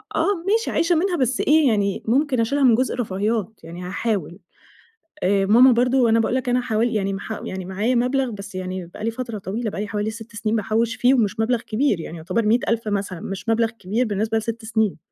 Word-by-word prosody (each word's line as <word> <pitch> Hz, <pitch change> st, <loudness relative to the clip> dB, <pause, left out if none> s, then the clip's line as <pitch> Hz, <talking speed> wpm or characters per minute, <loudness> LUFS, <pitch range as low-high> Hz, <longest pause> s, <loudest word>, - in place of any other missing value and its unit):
آه 390 Hz, -5 st, +1 dB
ماشي 450 Hz, +3 st, +1 dB
عايشة 340 Hz, +1 st, +2 dB
منها 355 Hz, +2 st, +1 dB
بس 260 Hz, -3 st, 0 dB
إيه 305 Hz, 0 st, +4 dB
يعني 205 Hz, -4 st, 0 dB
ممكن 265 Hz, +1 st, +2 dB
أشيلها 280 Hz, +5 st, +1 dB
من 245 Hz, -4 st, +6 dB
جزء 255 Hz, +3 st, 0 dB
الرفاهيات، 215 Hz, -1 st, -2 dB
يعني 170 Hz, +2 st, -8 dB
هاحاول، 190 Hz, -2 st, -3 dB, 0.8 s
آآ 195 Hz, +1 st, +2 dB
ماما 245 Hz, +6 st, +7 dB
برضه 245 Hz, 0 st, +3 dB
أنا 225 Hz, +1 st, +4 dB
باقول 225 Hz, +2 st, 0 dB
لك 255 Hz, -1 st, -1 dB
أنا 250 Hz, +1 st, +2 dB
حوالي 230 Hz, 0 st, 0 dB
يعني 195 Hz, -2 st, 0 dB
مح 205 Hz, +2 st, -5 dB
يعني 190 Hz, -1 st, -5 dB
معايا 205 Hz, +7 st, -1 dB
مبلغ 250 Hz, +1 st, +1 dB
بس 200 Hz, -2 st, -9 dB
يعني 185 Hz, -1 st, -4 dB
بقى 175 Hz, +5 st, -10 dB
لي 230 Hz, -, 0 dB
فترة 230 Hz, -2 st, -5 dB
طويلة 215 Hz, +4 st, -3 dB
بقى 195 Hz, -, -4 dB
لي 210 Hz, -, -3 dB
حوالي 210 Hz, +1 st, -2 dB
6 225 Hz, 0 st, -11 dB
سنين 215 Hz, +1 st, -1 dB
باحوش 225 Hz, +2 st, 0 dB
فيه 250 Hz, +2 st, +3 dB
ومش 220 Hz, -6 st, +1 dB
مبلغ 230 Hz, +1 st, +1 dB
كبير 220 Hz, -4 st, 0 dB
يعني 165 Hz, +1 st, -7 dB
يُعتبر 185 Hz, +8 st, -1 dB
100,000 230 Hz, 0 st, +1 dB
مثلًا 200 Hz, -3 st, -2 dB
مش 195 Hz, +5 st, -6 dB
مبلغ 225 Hz, 0 st, +2 dB
كبير 220 Hz, +2 st, -2 dB
بالنسبة 220 Hz, +1 st, -1 dB
ل6 225 Hz, +1 st, -4 dB
سنين، 220 Hz, -3 st, 0 dB
225 Hz, 210 wpm, -22 LUFS, 200-245 Hz, 0.8 s, ماما